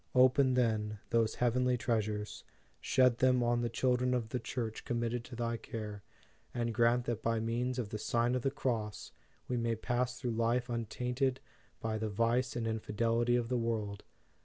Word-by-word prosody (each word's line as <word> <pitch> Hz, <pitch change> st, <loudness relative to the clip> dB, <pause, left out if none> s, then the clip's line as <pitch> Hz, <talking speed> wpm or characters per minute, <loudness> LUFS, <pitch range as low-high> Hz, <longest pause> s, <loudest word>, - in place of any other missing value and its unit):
Open, 130 Hz, +1 st, +5 dB
then, 110 Hz, -4 st, +1 dB
those 115 Hz, -1 st, +2 dB
heavenly 125 Hz, +1 st, +2 dB
treasures; 105 Hz, -3 st, -2 dB, 0.4 s
shed 125 Hz, -2 st, +3 dB
them 130 Hz, -1 st, +4 dB
on 120 Hz, 0 st, +2 dB
the 120 Hz, -, 0 dB
chil 125 Hz, +2 st, +2 dB
dren 125 Hz, 0 st, +1 dB
of 115 Hz, -3 st, -2 dB
the 125 Hz, -, -2 dB
Church 115 Hz, -2 st, -4 dB
committed 120 Hz, 0 st, -1 dB
to -, -, -9 dB
thy 115 Hz, 0 st, -1 dB
care, 105 Hz, -3 st, -6 dB, 0.5 s
and 120 Hz, -1 st, -1 dB
grant 120 Hz, +1 st, +3 dB
that 115 Hz, -2 st, -2 dB
by 115 Hz, 0 st, +1 dB
means 120 Hz, +3 st, -1 dB
of 120 Hz, -5 st, -2 dB
the 105 Hz, -, -4 dB
Sign 120 Hz, +3 st, +1 dB
of 125 Hz, -, 0 dB
the 135 Hz, -, +1 dB
Cross, 110 Hz, -, -3 dB, 0.4 s
we 125 Hz, -, -1 dB
may 115 Hz, -1 st, 0 dB
pass 125 Hz, +3 st, -1 dB
through 125 Hz, -3 st, -2 dB
life 115 Hz, +2 st, +1 dB
untainted 125 Hz, +3 st, -1 dB, 0.4 s
by 110 Hz, -1 st, -2 dB
the 110 Hz, 0 st, -1 dB
vice 115 Hz, +4 st, +1 dB
and 120 Hz, -2 st, -1 dB
infidelity 115 Hz, +2 st, +1 dB
of 120 Hz, -1 st, +1 dB
the 125 Hz, 0 st, 0 dB
world. 110 Hz, -3 st, -2 dB
120 Hz, 180 wpm, -33 LUFS, 110-125 Hz, 0.5 s, Open